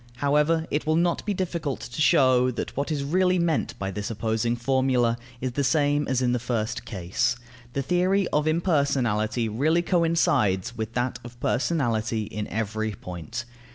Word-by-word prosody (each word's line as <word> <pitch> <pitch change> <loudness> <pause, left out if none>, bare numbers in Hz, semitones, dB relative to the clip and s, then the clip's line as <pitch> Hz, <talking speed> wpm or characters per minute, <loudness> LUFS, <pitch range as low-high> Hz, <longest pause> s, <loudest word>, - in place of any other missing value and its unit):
However, 150 +5 +2
it 150 +1 -1
will 155 - +3
not 170 +1 +1
be 205 - +1
difficult 170 -6 -2
to 120 +5 -5
show 130 -6 +4
that 125 - -4
what 140 +3 -2
is 145 -2 -1
really 185 +5 +2
meant 170 -4 0
by 95 0 -3
this 100 +1 -4
opposing 115 +1 -1
formula 125 -1 +2 0.3
is 130 0 -1
the 140 +4 -1
same 145 0 +2
as 130 -1 +1
in 125 - +2
the 125 - +1
first 115 -2 -2
case. 105 +6 -1 0.4
The 140 - -1
theory 185 +4 +2
of 150 +1 +1
impersonality 135 - +1
really 155 +10 +1
coincides 140 - +2
with 110 0 -4
that 120 0 -1
of 120 0 -11
personality 115 -7 0
in 105 0 -5
every 110 0 -2
point. 90 +5 -6
130 Hz, 165 wpm, -25 LUFS, 115-155 Hz, 0.4 s, show